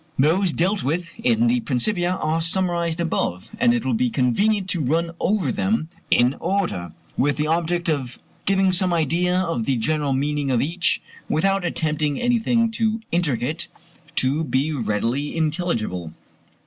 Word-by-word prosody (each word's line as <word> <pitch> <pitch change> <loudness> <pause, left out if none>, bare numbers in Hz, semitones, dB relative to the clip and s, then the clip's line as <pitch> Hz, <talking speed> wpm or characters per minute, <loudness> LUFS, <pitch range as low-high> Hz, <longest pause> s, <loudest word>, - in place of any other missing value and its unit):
Those 170 +7 +3
dealt 190 +5 0
with 165 +5 -2
in 235 0 +2
the 240 +1 +3
Principia 175 - 0
are 160 -2 -1
summarized 170 -1 +1
above, 95 - -2
and 240 - +4
it 235 -2 0
will - - +1
be 245 +2 +1
convenient 195 - +1
to 170 - 0
run 165 +5 0
over 190 -10 +1
them 190 -5 0 0.2
in 125 +2 +4
order, 175 - -1 0.2
with 145 +1 +2
the 150 - 0
object 170 +2 0
of 135 -6 -1 0.3
giving 195 -1 +3
some 185 -1 +1
idea 170 +3 +1
of 165 -11 -1
the 135 -2 +1
general 145 +4 0
meaning 145 +1 -1
of 125 -3 +2
each, 175 +7 0 0.3
without 195 +3 +1
attempting 155 -4 -1
anything 235 -1 +2
too 225 -1 0
intricate 160 -2 0 0.5
to 140 +5 +1
be 140 +2 0
readily 120 +4 -1
intelligible. 150 - -1
165 Hz, 150 wpm, -22 LUFS, 140-190 Hz, 0.5 s, and